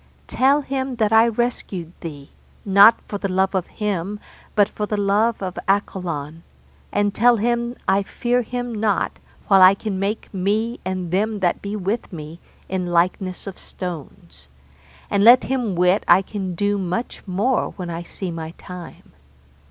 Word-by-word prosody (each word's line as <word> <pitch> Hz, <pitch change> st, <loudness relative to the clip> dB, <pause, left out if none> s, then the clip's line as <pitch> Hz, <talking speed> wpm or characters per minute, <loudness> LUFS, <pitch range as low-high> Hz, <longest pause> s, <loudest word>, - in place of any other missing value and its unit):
Tell 275 Hz, +3 st, +3 dB
him 265 Hz, -2 st, -3 dB
that 220 Hz, -2 st, +1 dB
I 225 Hz, +1 st, +6 dB
rescued 210 Hz, -7 st, -2 dB
thee, 145 Hz, -4 st, -8 dB, 0.3 s
not 200 Hz, +3 st, +7 dB
for 205 Hz, -, -4 dB
the 200 Hz, -, -2 dB
love 190 Hz, +1 st, +1 dB
of 185 Hz, -2 st, -1 dB
him 205 Hz, -1 st, -3 dB, 0.4 s
but 205 Hz, -1 st, +5 dB
for 210 Hz, 0 st, -4 dB
the 210 Hz, -, -2 dB
love 205 Hz, +2 st, +1 dB
of 185 Hz, -1 st, -4 dB
Accolon, 170 Hz, -6 st, -2 dB, 0.5 s
and 205 Hz, 0 st, +1 dB
tell 240 Hz, +2 st, +4 dB
him 235 Hz, +2 st, 0 dB
I 195 Hz, +1 st, +3 dB
fear 245 Hz, +5 st, 0 dB
him 245 Hz, 0 st, -4 dB
not 210 Hz, -2 st, 0 dB, 0.3 s
while 195 Hz, -2 st, +6 dB
I 185 Hz, +1 st, +8 dB
can 200 Hz, -2 st, -4 dB
make 205 Hz, +3 st, -3 dB
me 215 Hz, +5 st, -1 dB
and 185 Hz, -2 st, -3 dB
them 210 Hz, +4 st, 0 dB
that 175 Hz, -2 st, +1 dB
be 200 Hz, +1 st, -4 dB
with 210 Hz, +4 st, -3 dB
me 160 Hz, -1 st, -8 dB, 0.3 s
in 185 Hz, -1 st, -2 dB
likeness 180 Hz, +2 st, 0 dB
of 195 Hz, -2 st, -8 dB
stones; 175 Hz, 0 st, -8 dB, 0.6 s
and 200 Hz, 0 st, +2 dB
let 240 Hz, +3 st, +8 dB
him 245 Hz, -7 st, -1 dB
wit 180 Hz, +3 st, +3 dB
I 190 Hz, -, +6 dB
can 190 Hz, -3 st, -5 dB
do 205 Hz, +3 st, 0 dB
much 185 Hz, +6 st, -3 dB
more 210 Hz, +8 st, +1 dB
when 180 Hz, -3 st, -5 dB
I 165 Hz, 0 st, -4 dB
see 180 Hz, +1 st, -6 dB
my 165 Hz, 0 st, -6 dB
time. 180 Hz, -2 st, -11 dB
200 Hz, 165 wpm, -21 LUFS, 180-220 Hz, 0.6 s, I